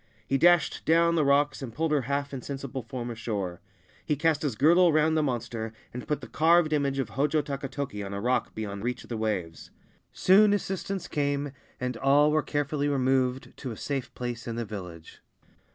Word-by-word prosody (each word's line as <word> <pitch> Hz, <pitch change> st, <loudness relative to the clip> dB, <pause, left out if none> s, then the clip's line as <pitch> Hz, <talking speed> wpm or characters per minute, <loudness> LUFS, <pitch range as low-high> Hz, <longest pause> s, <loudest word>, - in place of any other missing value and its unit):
He 135 Hz, -, 0 dB
dashed 175 Hz, -1 st, +4 dB
down 170 Hz, +1 st, +4 dB
the 165 Hz, -2 st, +2 dB
rocks, 140 Hz, 0 st, +2 dB
and 130 Hz, -4 st, -5 dB
pulled 160 Hz, +6 st, -1 dB
her 150 Hz, -2 st, +3 dB
half 140 Hz, +2 st, -2 dB
insensible 135 Hz, 0 st, -5 dB
form 120 Hz, 0 st, -5 dB
ashore. 100 Hz, -6 st, -4 dB, 0.4 s
He 150 Hz, -, 0 dB
cast 155 Hz, +1 st, +1 dB
his 140 Hz, -7 st, -1 dB
girdle 170 Hz, +7 st, +5 dB
round 155 Hz, +1 st, +3 dB
the 155 Hz, -, +3 dB
monster, 115 Hz, -5 st, -3 dB, 0.2 s
and 125 Hz, -, -7 dB
put 150 Hz, -, -1 dB
the -, -, -8 dB
carved 165 Hz, 0 st, +3 dB
image 140 Hz, -2 st, +1 dB
of 135 Hz, -, -1 dB
Hojo 150 Hz, +2 st, +1 dB
Takatoki 140 Hz, -6 st, -4 dB
on 100 Hz, -, -6 dB
a 100 Hz, -, -3 dB
rock 125 Hz, +4 st, 0 dB
beyond 100 Hz, -2 st, -5 dB
reach 125 Hz, +1 st, -3 dB
of -, -, -16 dB
the 120 Hz, -, -3 dB
waves. 95 Hz, -8 st, -3 dB, 0.4 s
Soon 205 Hz, +2 st, +5 dB
assistance 195 Hz, -1 st, -3 dB
came, 145 Hz, -1 st, -1 dB, 0.3 s
and 125 Hz, -1 st, -3 dB
all 145 Hz, +4 st, +4 dB
were 155 Hz, 0 st, +3 dB
carefully 145 Hz, 0 st, -1 dB
removed 130 Hz, -2 st, 0 dB
to 130 Hz, -, -6 dB
a 115 Hz, -, -6 dB
safe 135 Hz, -3 st, -3 dB
place 120 Hz, -1 st, -5 dB
in 115 Hz, -, -3 dB
the 115 Hz, 0 st, -3 dB
village. 90 Hz, -6 st, -9 dB
140 Hz, 190 wpm, -27 LUFS, 120-150 Hz, 0.4 s, girdle